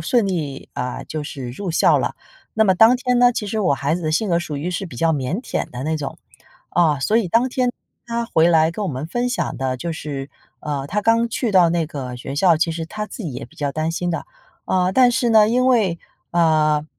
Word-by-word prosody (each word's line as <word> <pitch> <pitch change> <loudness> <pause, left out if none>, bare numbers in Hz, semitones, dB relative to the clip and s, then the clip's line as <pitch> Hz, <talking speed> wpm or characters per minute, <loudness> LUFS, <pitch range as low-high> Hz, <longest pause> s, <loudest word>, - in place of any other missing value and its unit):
顺 215 +6 +1
利 150 -8 -4
啊， 125 0 -4
就 155 -1 -5
是 135 -4 -6
入 180 +8 -5
校 - - +4
了。 - - -2 0.4
那 220 0 +4
么 190 - +4
当 225 +6 +6
天 250 0 0
呢， 245 0 +6
其 210 - -3
实 215 +2 -2
我 180 -8 +2
孩 140 +3 -1
子 175 - -4
的 155 - -1
性 195 +7 0
格 170 0 +2
属 155 -4 -5
于 155 +5 -3
是 185 +3 -3
比 135 - -11
较 165 +4 +2
腼 145 - -2
腆 - - -3
的 125 +2 -6
那 160 +1 0
种。 145 -3 -6 0.5
啊， 155 -5 +2
所 210 +11 +1
以 220 -6 +1
当 235 +8 +2
天 250 -1 0 0.4
他 235 0 -2
回 165 -6 +3
来 160 -1 +4
跟 210 - -4
我 190 - -2
们 135 +2 -4
分 240 +8 -1
享 245 - -2
的 130 -1 -2
就 170 +5 -4
是， 140 -3 -6 0.3
呃， 145 -2 -3
他 210 +2 0
刚 230 +2 +2
去 230 -1 -2
到 180 -3 +6
那 170 -2 0
个 130 -5 -6
学 135 +2 -6
校， 170 +3 +4
其 165 +1 0
实 165 0 -4
他 210 +6 -5
自 225 - -8
己 155 -7 -4
也 125 - -6
比 160 - -18
较 145 -3 -2
担 155 +2 -2
心 175 +1 -2
的。 165 - -4 0.4
呃， 185 0 +1
但 250 +1 +5
是 245 -1 +1
呢， 215 -1 +6
因 250 +2 +2
为 210 -10 +2 0.3
呃， 155 -3 +3
170 Hz, 260 characters per minute, -21 LUFS, 150-220 Hz, 0.5 s, 当